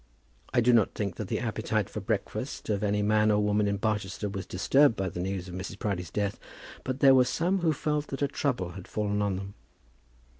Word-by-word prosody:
I 120 - +3
do 120 +1 +4
not 110 -4 +3
think 100 -4 -3
that - - -4
the - - -1
appetite - - -1
for - - -5
breakfast - - -3
of 100 -2 0
any 105 0 +1
man 105 +1 +3
or 105 -1 +3
woman 105 0 +2
in 100 0 0
Barchester 105 -1 -2
was 95 -1 -5
disturbed 135 +7 +4
by 95 -2 -1
the 90 - -7
news 95 0 -3
of 90 - -8
Mrs. 95 +1 -6
Proudie's 95 -5 -2
death, 100 -1 -2 0.4
but 130 +1 -3
there 135 -1 +8
were 130 -1 +6
some 180 +8 0
who 170 -2 +2
felt 150 0 -1
that 135 +1 -3
a - - +3
trouble 130 -9 -1
had 95 +1 -10
fallen 105 -1 -1
on 100 -2 0
them. 100 +1 -6
105 Hz, 220 wpm, -28 LUFS, 95-125 Hz, 0.4 s, there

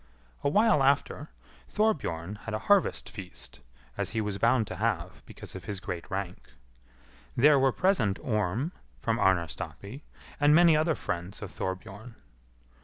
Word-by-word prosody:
A - - +2
while 210 -1 +4
after, 140 +2 +1 0.4
Thorbjorn 105 - -1
had 115 -1 -3
a 110 - -6
harvest 205 -2 +3
feast, 100 -4 -9 0.4
as - - 0
he - - +3
was 105 -2 -2
bound 115 +1 +3
to - - -7
have 95 -5 -2
because - - -10
of - - -9
his 100 -2 -4
great 90 -4 -6
rank. 95 -1 -5 0.8
There 140 +3 +6
were 135 0 +4
present 125 - +1
Orm, 110 - -1 0.3
from - - -1
Arnarstapi, 95 - -1 0.4
and 145 +1 +5
many 170 -1 +6
other 155 +1 +2
friends 90 +5 -5
of 100 - -7
Thorbjorn. 100 +5 -6
110 Hz, 145 wpm, -28 LUFS, 95-145 Hz, 0.8 s, There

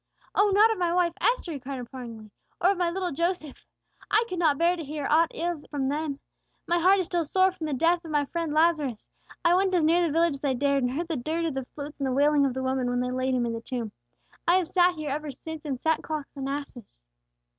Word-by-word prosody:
"Oh, 410 0 +4
not 425 +3 +6
of 440 - -2
my 350 -1 +1
wife 350 -1 +2
Esther," 475 -8 +1
he 290 - -5
cried, 270 +1 -6
imploringly, 235 -3 -9 0.3
"or 365 - +4
of 400 - -2
my 350 -1 +2
little 365 0 -2
Joseph! 335 -1 -3 0.4
I 435 +2 +4
could 365 -6 -4
not 310 -5 +3
bear 340 +3 +3
to 335 - -6
hear 295 0 -5
aught 325 +2 +3
of - - -15 0.2
ill - - -17
from 275 -3 -1
them. 290 -1 -2 0.5
My 345 0 +1
heart 375 +3 +5
is 375 - 0
still 345 0 0
sore 375 +5 +3
for 335 -3 -6
the 300 - -2
death 335 +6 +2
of 325 - -9
my 295 -2 +1
friend 330 +1 -3
Lazarus. 305 -7 +1 0.4
I 340 - +6
went 375 +1 +2
as 340 - +3
near 335 +3 +4
the 335 -3 +1
village 330 +1 +2
as 275 - -19
I 270 - +2
dared, 280 +1 +1
and 250 0 0
heard 335 +5 -2
the 325 -3 -2
dirge 320 +7 -2
of 320 - -1
the 265 -1 -4
flutes 290 0 -7
and 275 - 0
the 260 - 0
wailing 285 +1 +4
of 255 - -4
the 260 - -2
women, 260 -1 0
when 245 0 0
they 250 0 -1
laid 255 0 0
him 245 -1 +1
in 230 - -2
the 230 - -5
tomb. 235 -4 -4 0.6
I 345 - +5
have 370 -3 +2
sat 355 0 +3
here 305 -3 -4
ever 300 +1 -3
since 315 +3 -8
in 275 -3 -2
sackcloth 310 0 -1
and 270 -1 -4
ashes." 280 -5 -6
305 Hz, 260 wpm, -27 LUFS, 270-345 Hz, 0.6 s, not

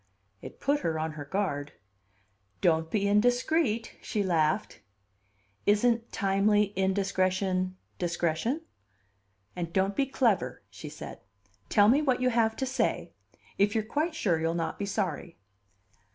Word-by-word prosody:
It - - -10
put 285 +1 +1
her 160 - -1
on 160 0 -2
her 150 -1 -7
guard. 145 -5 -2 0.9
"Don't 160 - +2
be 200 +2 0
indiscreet," 245 +3 +1
she 210 -3 -1
laughed. 160 -4 0 0.9
"Isn't 230 +3 +2
timely 200 +1 +2
indiscretion 185 -1 0 0.2
discretion?" 175 - -1 0.9
"And 170 -2 -4
don't 195 +2 +1
be 275 - +1
clever," 200 - 0
she - - -8
said. - - -9 0.5
"Tell 205 -1 +5
me 265 +7 +5
what 260 -4 +1
you 255 0 +2
have 225 -1 +2
to 265 - -2
say 265 +1 -1 0.5
if 205 +2 +3
you're 220 - +1
quite 305 +9 -1
sure 175 - +1
you'll 165 +1 0
not 165 -1 -3
be 200 - -2
sorry." 180 -4 -3
200 Hz, 135 wpm, -29 LUFS, 170-230 Hz, 0.9 s, Tell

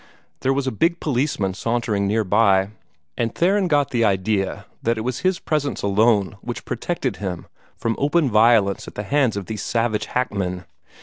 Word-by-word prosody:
There 130 - +1
was 135 0 0
a 130 - 0
big 165 - +1
policeman 125 -9 0
sauntering 110 -2 -1
near 110 +2 +1
by, 95 -1 +3 0.5
and 115 -1 -2
Theron 190 +2 +2
got 145 -4 +2
the 120 -3 +1
idea 95 -1 0 0.2
that 115 0 0
it - - -2
was 125 +2 -3
his 185 -1 +1
presence 150 -3 -2
alone 100 -2 +2
which - - -6
protected - - -3
him 95 -4 -5 0.3
from 115 -1 -1
open 150 +2 +2
violence 110 -2 +4
at - - -10
the 105 - -4
hands 130 -1 +1
of 100 - -4
these 105 +2 -5
savage 110 -2 -1
hackmen. 95 -7 -2
115 Hz, 175 wpm, -22 LUFS, 100-135 Hz, 0.5 s, violence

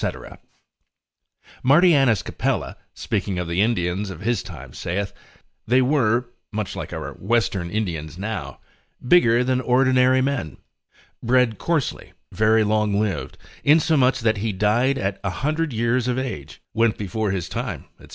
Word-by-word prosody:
Martianus 135 - +4
Capella, - - -2 0.2
speaking 95 -3 -2
of 90 -1 -2
the 85 +3 0
Indians 100 -3 0
of 95 - -8
his 120 +3 0
time, 85 -8 -10
saith, 95 +3 -3 0.5
they 125 +3 +4
were 125 -3 +2 0.3
(much 105 -3 -4
like - - -6
our - - -5
western 100 -4 -1
Indians 85 -6 -3
now) 105 +3 -5 0.5
bigger 120 -7 +5
than 130 0 0
ordinary 130 0 +3
men, 130 - -2 0.6
bred 125 -2 +2
coarsely, 165 -6 -2 0.2
very 110 +1 +3
long 105 -1 +1
lived, 105 -5 -2 0.3
insomuch, 145 -4 +3
that 110 -1 +2
he 110 +2 -1
that - - -10
died 120 +7 +2
at 95 -3 -2
a 100 - -1
hundred 155 - -1
years 120 +2 0
of 125 0 0
age, 115 - -5
went 115 -1 +2
before 105 +2 -2
his 95 -3 -2
time, 110 - -5
&c. - - -15
110 Hz, 140 wpm, -22 LUFS, 100-130 Hz, 0.6 s, bigger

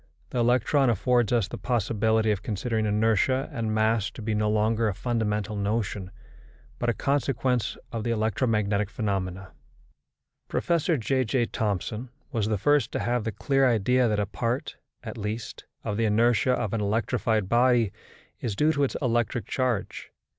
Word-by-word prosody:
The 125 - -1
electron 125 +3 +3
affords 120 +1 +2
us 115 -6 +2
the - - -7
possibility 110 -1 +1
of 105 -2 -1
considering 110 +1 -1
inertia 110 +5 +2
and 115 -4 -2
mass 110 -1 +2
to 115 - -10
be 110 0 -1
no 105 0 +1
longer 110 +1 +2
a 100 - -1
fundamental 105 -2 -1
notion, 100 -2 -2 0.7
but - - 0
a - - +2
consequence 130 -3 0
of 115 -3 -3
the 120 - -2
electromagnetic 105 -2 +1
phenomena. 95 -4 -3 1.0
Professor 170 -1 +1
J.J. 130 0 +1
Thomson 110 +3 -3 0.2
was 110 -6 0
the 110 -1 0
first 145 +2 +2
to - - -1
have 120 -2 -1
the 115 - -1
clear 135 +5 +2
idea 125 +3 +3
that 105 -2 0
a 105 - +1
part, 120 - -3 0.3
at 110 -1 -7
least, 110 +2 -5 0.2
of 105 - -2
the 115 - +2
inertia 115 +4 +3
of 110 -4 -2
an 115 - 0
electrified 110 0 0
body 120 -2 +3 0.5
is 110 -5 -3
due 150 +8 +3
to 145 -2 +1
its 135 - 0
electric 120 -1 0
charge. 125 -6 -2
115 Hz, 160 wpm, -26 LUFS, 105-125 Hz, 1.0 s, electron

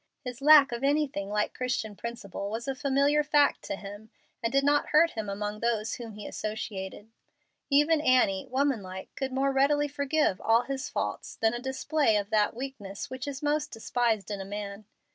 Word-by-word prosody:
His 250 +1 -6
lack 290 -2 +8
of 235 +2 -4
anything 280 -8 0
like 210 0 0
Christian 245 -4 -2
principle 200 -4 -6
was 225 +4 -4
a 270 - 0
familiar 280 +2 +2
fact 295 -1 +3
to - - -3
him, 205 +2 -10 0.3
and 230 - -1
did 275 +1 +3
not 290 +1 +3
hurt 330 +2 +4
him 220 -3 -4
among 205 +1 -4
those 225 -2 0
with - - -4
whom 230 -3 -8
he 210 - -8
associated. 210 -1 -5 0.6
Even 300 +2 +4
Annie, 250 -9 +3
woman 265 -3 +1
like, 190 0 -9
could 270 -1 -3
more 270 +1 +1
readily 290 +2 +3
forgive 285 -7 0
all 230 +2 +3
his 265 +1 -4
faults - - -3
than 225 0 +1
a 240 - -3
display 265 -1 +1
of 205 +1 -3
that 215 0 +2
weakness 235 -7 -6
which 260 +1 -5
is 280 0 -5
most 295 0 0
despised 225 -2 -1
in 200 -1 -3
a - - -4
man. 200 +1 -6
240 Hz, 190 wpm, -28 LUFS, 210-280 Hz, 0.6 s, lack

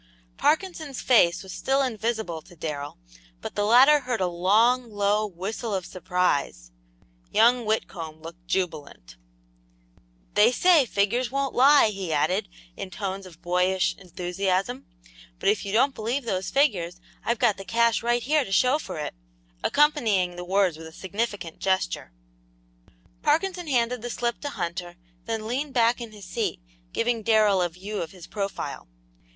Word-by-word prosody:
Parkinson's 315 - 0
face 180 -9 +4
was 190 - -9
still 270 +1 +1
invisible 220 -8 -2
to 175 - -17
Darrell, 150 -3 -5 0.4
but - - -7
the 205 - 0
latter 260 +7 +7
heard 250 -3 -3
a 185 - +1
long, 220 +8 +2
low 205 0 +1
whistle 205 +4 -4
of 185 -2 -3
surprise. 175 - -1 0.6
Young 240 +1 +4
Whitcomb 165 -7 -3
looked 170 +2 -12
jubilant. 150 - -3 1.2
"They 215 +3 +5
say 320 -1 +4
figures 225 +5 +1
won't 275 0 -1
lie," 275 -2 +6
he 195 -5 -5
added, 185 +7 +1 0.3
in 195 - -6
tones 195 0 -5
of 170 -1 -17
boyish 180 +1 +1
enthusiasm, 190 +6 -2 0.5
"but - - +1
if 210 - +1
you - - -3
don't 260 +6 +3
believe 240 +4 -2
those 190 -4 -2
figures, 185 - +1 0.2
I've 235 - 0
got 220 -4 +2
the 195 - -7
cash 230 +3 +2
right 240 0 +1
here 300 +2 +2
to 195 - -9
show 255 +8 +3
for 185 - -7
it," 150 - -4 0.5
accompanying 220 -12 +2
the 175 - -6
words 185 -2 +1
with 160 0 -9
a - - -11
significant 195 -1 -4
gesture. 190 - -1 1.1
Parkinson 360 -1 0
handed 245 -3 +1
the 240 - -5
slip 240 0 -2
to 290 - -3
Hunter, 175 -6 -5 0.3
then 225 -1 -3
leaned 265 +5 -3
back 235 0 +3
in 230 -2 -7
his 205 -3 -12
seat, 195 - -2 0.3
giving 230 -1 0
Darrell 215 -3 +3
a 175 - +1
view 195 +5 -6
of 165 - -4
his 180 -2 -12
profile. 200 - -5
205 Hz, 155 wpm, -25 LUFS, 180-240 Hz, 1.2 s, latter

